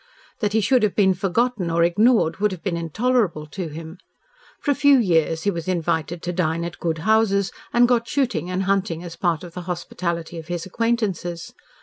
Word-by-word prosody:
That 210 -3 -1
he 220 - +3
should 250 +4 +3
have 210 -3 +1
been 190 -2 +4
forgotten 195 +1 0
or 170 0 +2
ignored 200 -1 +3
would 210 +1 +1
have 185 -3 -7
been 190 -4 -1
intolerable 170 - 0
to 170 +4 -5
him. 160 +3 -9 0.6
For 290 - 0
a - - +4
few 285 0 +5
years 165 -7 +2
he 205 - +2
was 170 -2 -5
invited 165 -1 -1
to 180 - -2
dine 170 -1 0
at 170 - -7
good 165 -2 -1
houses, 215 -3 +3 0.2
and 240 0 +5
got 235 -1 +1
shooting 255 -10 -1
and 185 +1 -1
hunting 190 -3 0
as 170 -2 -8
part 170 -3 0
of 175 -2 -10
the 180 - -6
hospitality 170 -1 -3
of 160 - -10
his 175 -1 -3
acquaintances. 190 -5 -2
180 Hz, 200 wpm, -22 LUFS, 170-220 Hz, 0.6 s, few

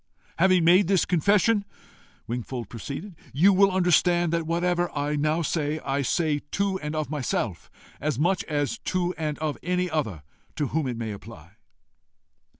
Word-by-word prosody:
"Having 185 -1 +4
made 180 +2 +6
this 195 -2 +3
confession," 200 +4 +3 0.6
Wingfold 120 -1 -5
proceeded, 140 - -7 0.2
"you 185 +8 +5
will 195 +1 +5
understand 175 -2 +3
that 165 -1 -1
whatever 175 +1 +1
I 145 +1 0
now 155 +3 +1
say, 155 -1 -1
I 140 +1 0
say 150 +2 +1
to 200 -1 0
and 150 -1 -4
of 155 -1 -2
myself 120 - -2 0.3
as 150 -4 -1
much 175 +6 +1
as 145 -3 -2
to 180 -1 -1
and 155 -2 -3
of 155 -2 -3
any 180 +1 -1
other 110 - -2 0.3
to 145 -4 -1
whom 155 -3 -1
it 120 -2 -3
may 115 -2 -3
apply." 95 -5 -11
155 Hz, 155 wpm, -26 LUFS, 140-180 Hz, 0.6 s, made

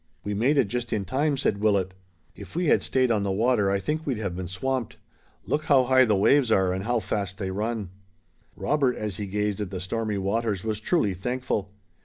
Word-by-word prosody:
"We 105 - -3
made 125 +9 +2
it 130 -6 +4
just 120 +2 -3
in 105 -4 -1
time," 140 - 0
said 105 -6 0
Willet. 100 -3 +1 0.4
"If - - -11
we 175 +1 0
had - - +4
stayed 130 -2 +1
on 105 -3 +2
the 100 -1 -1
water 110 0 +2
I 100 - +2
think 155 +8 -2
we'd 135 -6 -2
have 100 -5 -3
been 90 0 -4
swamped. 125 +6 -3 0.5
Look 150 +1 -1
how 135 -3 +5
high 130 +1 +5
the 110 -3 +2
waves 120 +5 +4
are 95 -3 +3
and 95 +1 -4
how 120 0 +1
fast 95 -2 -3
they 95 -3 -3
run!" 105 -1 -3 0.6
Robert 140 -4 +1
as 105 -4 -4
he 105 - -4
gazed 105 +1 -1
at 100 - -3
the 95 -1 -5
stormy 105 +3 -2
waters 100 0 -1
was 110 -1 -2
truly 110 - +1
thankful. 105 0 -3
110 Hz, 215 wpm, -26 LUFS, 100-130 Hz, 0.6 s, how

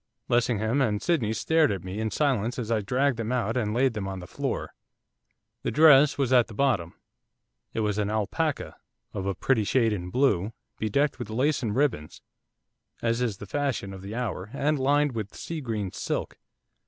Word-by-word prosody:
Lessingham 120 +1 +2
and 105 -6 +1
Sydney 135 -10 +1
stared 155 +5 +2
at 95 -4 -3
me 95 +3 -5
in 110 0 -1
silence 125 -1 0
as 115 -3 -3
I 110 -2 +2
dragged 130 +5 +1
them 115 0 -3
out 115 -3 0
and 110 -4 0
laid 125 +2 +2
them 105 -3 -4
on 95 0 -4
the 90 - -8
floor. - - -4 0.9
The - - -1
dress 150 -2 +6
was 135 -2 +1
at 125 -2 +5
the 110 - -11
bottom, 105 -11 +1 0.8
it 115 - -2
was 105 -1 0
an 105 -1 0
alpaca, 110 +9 -2 0.4
of 95 0 -3
a 100 - -1
pretty 115 +2 +1
shade 115 +1 +2
in 90 -3 -4
blue, 110 -4 +1 0.3
bedecked 140 +7 +1
with - - -5
lace 135 +7 +1
and 110 -4 -2
ribbons, 125 - -1 0.8
as 115 +1 +1
is 115 -6 -1
the 105 - -8
fashion 130 -5 -2
of 95 - -9
the 100 +3 -7
hour, 105 -5 -3
and 145 +1 0
lined 145 +2 +3
with 110 -4 -5
sea 165 -2 -5
green 110 -7 -3
silk. 100 - -4
115 Hz, 190 wpm, -27 LUFS, 105-135 Hz, 0.9 s, dress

